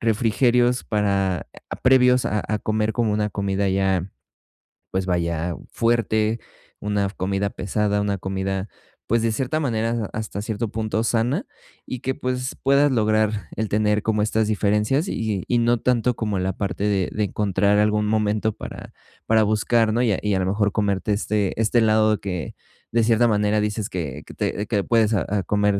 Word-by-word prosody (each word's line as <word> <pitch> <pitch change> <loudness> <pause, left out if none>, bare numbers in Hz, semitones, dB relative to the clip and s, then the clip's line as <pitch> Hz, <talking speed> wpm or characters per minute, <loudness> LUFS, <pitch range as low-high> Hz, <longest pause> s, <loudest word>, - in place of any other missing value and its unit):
refrigerios 120 +2 +2
para 100 -4 0 0.2
ah, - - -4
previos 125 -1 +5
a 105 - 0
a 105 0 0
comer 110 0 -1
como 115 -3 +1
una 105 0 0
comida 100 -1 -1
ya, 95 -1 0 0.8
pues 95 0 -1
vaya, 85 -2 -1 0.2
fuerte, 115 -1 +1 0.4
una 105 -1 0
comida 100 +1 -2
pesada, 105 +2 -1
una 100 -1 -1
comida, 95 +1 -3 0.4
pues, 115 0 +2
de 115 -1 +1
cierta 135 +7 -1
manera, 115 -5 -1
hasta 105 -2 -4
cierto 110 0 -3
punto 110 +1 -2
sana, 120 - 0 0.4
y 130 - -5
que, 130 0 -2
pues, 125 0 -3
puedas 140 +1 +4
lograr 110 -5 +1
el 110 0 -2
tener 105 0 +1
como 105 -1 +1
estas 110 0 +1
diferencias 105 - +1
y - - -2 0.3
y - - -6
y 120 - +2
no 120 0 +3
tanto 125 -1 +1
como 105 -4 -2
la 95 0 -1
parte 100 -1 -3
de 100 -3 +1
de 105 - 0
encontrar 100 0 +1
algún 105 0 +2
momento 110 0 +1
para - - -9 0.4
para 110 -1 +4
buscar, 110 +1 +2
¿no? 120 - +1
Y 120 -4 +2
a - - -1
y 105 -1 0
a - - +1
lo 95 - 0
mejor, 100 +1 +1
comerte 105 0 0
este 105 0 -1
este 110 +2 +1
helado 110 -1 +3
que 90 -5 -5 0.4
de 115 0 +2
cierta 115 +1 +4
manera, 105 0 +2
dices 105 0 -2
que 75 -5 -5
que - - -11
te 105 - -2
que 100 -4 0
puedes, 115 -2 +2
ah 95 - 0
ah, 100 -1 0
comer, 105 -1 +1
105 Hz, 180 wpm, -23 LUFS, 100-115 Hz, 0.8 s, previos